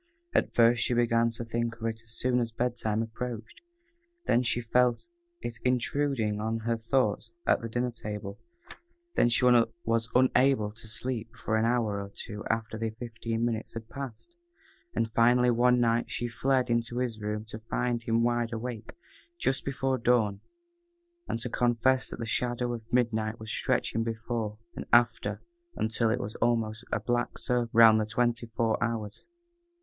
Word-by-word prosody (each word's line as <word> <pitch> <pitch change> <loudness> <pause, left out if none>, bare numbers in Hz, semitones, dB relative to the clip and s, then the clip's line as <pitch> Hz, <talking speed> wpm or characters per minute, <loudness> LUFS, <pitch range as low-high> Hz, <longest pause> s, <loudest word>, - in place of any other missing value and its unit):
At - - +2
first 120 0 +5
she 125 - +1
began 115 -1 +3
to 115 +1 -6
think 115 0 -2
of 115 0 -7
it 110 0 -3
as 110 0 -9
soon 125 0 +1
as 115 -1 -1
bed 120 +2 -1
time 110 -1 0
approached; 115 0 -6 0.6
then 120 - +3
she 120 -1 +1
felt 120 +1 +2 0.4
it 115 -2 -5
intruding 125 -3 0
on 110 +1 -1
her 115 +1 0
thoughts 115 -1 0
at - - +3
the 115 - -5
dinner 120 +2 -1
table; 105 -3 -6 0.7
then 120 - +4
she 120 +2 +2
was 115 -1 +2
unable 130 -3 +4
to 110 +1 -11
sleep 115 0 -4
for 110 -2 -2
an 110 +1 +2
hour 115 -4 +1
or 100 - -7
two 105 +1 -7
after 115 0 -1
the 115 0 -1
fifteen 115 0 -3
minutes 115 -1 -3
had 115 -1 -7
passed, 140 - -8 0.6
and, 115 -1 0
finally, 120 +2 +4
one 125 +1 +4
night, 115 -1 +2
she 120 +2 -2
fled 130 +2 +1
into 120 +1 0
his 120 -3 -2
room 105 +1 -3
to 110 - -6
find 120 +2 -1
him 115 0 +1
wide 120 0 +1
awake, 115 -1 -5 0.4
just 135 - 0
before 135 -1 -1
dawn, 115 -4 +2 0.9
and - - -1
to 125 - -2
confess 125 +2 +2
that - - -6
the 115 - -4
shadow 120 +2 -1
of 115 -1 -8
midnight 115 -2 +1
was 110 0 -6
stretched 115 +1 0
before 110 -1 -3 0.2
and - - -6
after 115 -2 +3 0.3
until 110 +1 +1
it 120 +3 +1
was 110 -3 -5
almost 115 -1 0
a - - +1
black 120 0 -1
circle 120 -1 0
round 110 -1 +7
the 110 - 0
twenty 120 0 0
four 110 0 0
hours. 110 - -4
115 Hz, 170 wpm, -29 LUFS, 110-120 Hz, 0.9 s, round